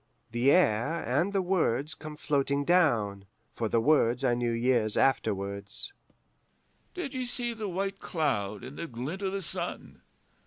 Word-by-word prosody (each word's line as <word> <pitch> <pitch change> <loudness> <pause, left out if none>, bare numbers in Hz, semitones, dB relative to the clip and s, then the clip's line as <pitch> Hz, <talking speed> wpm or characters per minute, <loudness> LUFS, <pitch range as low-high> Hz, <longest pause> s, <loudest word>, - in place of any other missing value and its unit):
The 120 +4 +3
air 145 -1 +3
and 145 - +1
the 195 -2 +1
words 155 -6 +1
come 155 +1 -8
floating 140 -1 0
down 115 - +2 0.3
(for 115 -2 -2
the 115 - +3
words 125 -1 +3
I 125 -2 +3
knew 120 0 0
years 115 -2 +2
afterwards): 100 - 0 1.0
'Did 350 -7 -4
ye 260 -1 -2
see 240 -1 -2
the 220 -3 -4
white 195 +2 -2
cloud 105 - -1
in 130 +3 -9
the 170 - -4
glint 135 - -5
o' 195 - 0
the 195 0 -3
sun? - - -6
140 Hz, 155 wpm, -29 LUFS, 115-180 Hz, 1.0 s, The